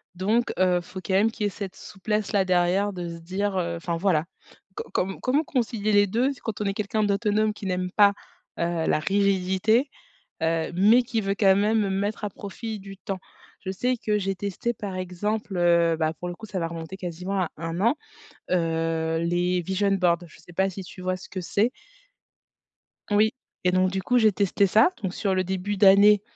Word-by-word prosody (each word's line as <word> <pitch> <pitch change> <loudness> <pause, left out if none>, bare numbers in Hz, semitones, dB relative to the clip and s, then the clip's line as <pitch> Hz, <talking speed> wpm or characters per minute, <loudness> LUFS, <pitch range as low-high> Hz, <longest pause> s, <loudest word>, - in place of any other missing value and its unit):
donc, 215 +6 +1
heu, 180 -1 +3
faut 185 +2 -9
quand 190 - -1
même 205 +4 +4
qu'il 215 - -5
y - - +3
ait - - -1
cette 195 -1 -7
souplesse, 210 +1 -3
là, 195 -2 +2
derrière, 185 +3 +2
de 175 -2 -5
se 170 - -8
dire, 190 +3 -2
heu: 170 -1 -1
«Enfin 170 0 -3
voilà, 165 -3 +1 0.5
co - - -6
comme 190 +1 -1
comment 275 +5 +2
concilier 225 -6 -1
les 205 -1 +5
2 245 +8 +1
quand 215 -2 -4
on - - -1
est 195 - 0
quelqu'un 210 +1 -1
d'autonome 210 +1 +1
qui 205 - -9
n'aime 180 -1 -2
pas, 200 0 +5 0.5
heu, 170 -1 0
la - - +2
rigidité, 200 - +2 0.5
heu, 165 0 0
mais 215 +7 +5
qui 230 -2 -2
veut, 195 0 -1
quand 195 -2 +5
même, 210 -1 +2
mettre 205 +2 -2
à 205 - -2
profit 210 +2 -7
du 195 0 -10
temps?» 195 -2 -5 0.4
Je 190 - -2
sais 250 +6 0
que 210 -2 0
j'ai 195 -1 -1
testé, 205 +5 -3
par 195 -3 -6
exemple, 190 +2 -3
heu, 170 -1 +3
bah, 160 -1 0
pour 180 - -4
le 175 - -5
coup, 220 - -10
ça 195 -2 -4
va 165 - 0
remonter 165 +2 -7
quasiment 180 +2 -3
à 170 - -1
1 165 +2 -4
an, 230 +6 +3 0.6
heu, 165 -1 0
les 175 +2 +1
vision 190 +3 0
boards. 180 -3 +2
Je - - -18
sais 175 - -16
pas 190 +2 +1
si 190 0 -7
tu 185 - -11
vois 185 0 -1
ce - - -12
que 185 - -5
c'est? 205 +7 +1 1.4
Oui, 215 +2 +4 0.3
et 180 - +3
donc 185 0 +3
du 190 0 -2
coup, 250 +5 +2
j'ai 220 -2 +5
testé 200 0 +2
ça, 220 - +5
donc 190 -3 -3
sur 195 -1 -1
le 185 -1 0
début 190 +2 -2
d'année, 200 +1 +7
195 Hz, 205 wpm, -25 LUFS, 180-210 Hz, 1.4 s, d'année